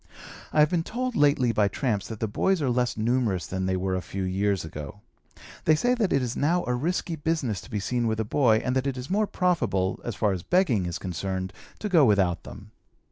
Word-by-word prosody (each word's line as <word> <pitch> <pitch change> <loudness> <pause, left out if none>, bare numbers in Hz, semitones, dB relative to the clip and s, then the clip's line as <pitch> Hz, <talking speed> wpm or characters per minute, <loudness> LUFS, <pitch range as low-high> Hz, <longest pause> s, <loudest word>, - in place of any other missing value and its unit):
I 155 - +4
have 150 - +4
been 175 -2 +2
told 250 +7 -3
lately 140 - +3
by 105 -2 +2
tramps 105 -1 -1
that 110 -2 -7
the 110 - -1
boys 190 - +1
are 135 -4 0
less 125 -1 0
numerous 115 -4 0
than 95 0 -3
they 95 0 0
were 95 0 -1
a 95 - -1
few 95 +1 -5
years 95 0 0
ago. 75 +5 -8 0.6
They 155 - +5
say 245 +10 +2
that 225 -7 0
it 135 - +2
is 125 -1 -3
now 170 +5 +1
a 125 - 0
risky 165 +6 -1
business 145 - -1
to - - -14
be 105 - -2
seen 120 +3 -1
with 110 0 -1
a 110 - 0
boy, 110 -2 +3
and 125 0 0
that 130 +1 0
it 135 -2 -2
is 125 +6 -6
more 210 +2 +2
profitable, 120 - 0
as 120 - -4
far 105 -1 +1
as 95 -2 -2
begging 125 - +2
is 85 0 -3
concerned, 95 +1 -4 0.2
to 215 - -4
go 175 -7 +5
without 100 -7 +3
them. - - -11
120 Hz, 235 wpm, -26 LUFS, 95-150 Hz, 0.6 s, They